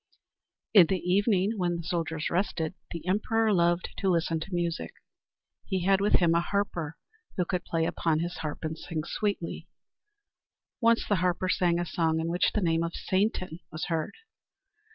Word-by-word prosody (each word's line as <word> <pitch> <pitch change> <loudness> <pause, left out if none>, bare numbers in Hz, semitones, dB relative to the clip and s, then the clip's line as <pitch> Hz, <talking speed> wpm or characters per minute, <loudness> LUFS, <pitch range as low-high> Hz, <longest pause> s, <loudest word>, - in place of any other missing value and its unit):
In 190 -6 +8
the 190 - +1
evening 200 +3 +1
when 175 -1 +1
the 170 - -6
soldiers 165 -2 -2
rested, 170 -3 -1 0.2
the 170 - -7
emperor 215 +3 +2
loved 175 0 +2
to 195 - +1
listen 165 -2 +1
to 175 +5 -8
music. 170 - -2 0.7
He 190 -2 -1
had 195 0 +4
with 205 - +2
him 170 -2 +5
a 170 - +3
harper 175 -5 -2 0.4
who 180 - +1
would 180 - 0
play 165 -1 0
upon 165 -1 0
his 175 +2 -3
harp 155 0 -5
and 160 0 -2
sing 160 -1 -4
sweetly. 200 -3 -3 1.1
Once 230 0 +4
the 205 - +2
harper 180 +1 0
sang 175 -2 +2
a 175 - -1
song 160 -1 0
in 165 +1 -1
which 175 +2 +1
the 210 - +2
name 165 -2 +2
of 170 0 -2
Satan 185 -4 -1
was 155 - -4
heard. 160 -2 -2
175 Hz, 175 wpm, -28 LUFS, 165-190 Hz, 1.1 s, In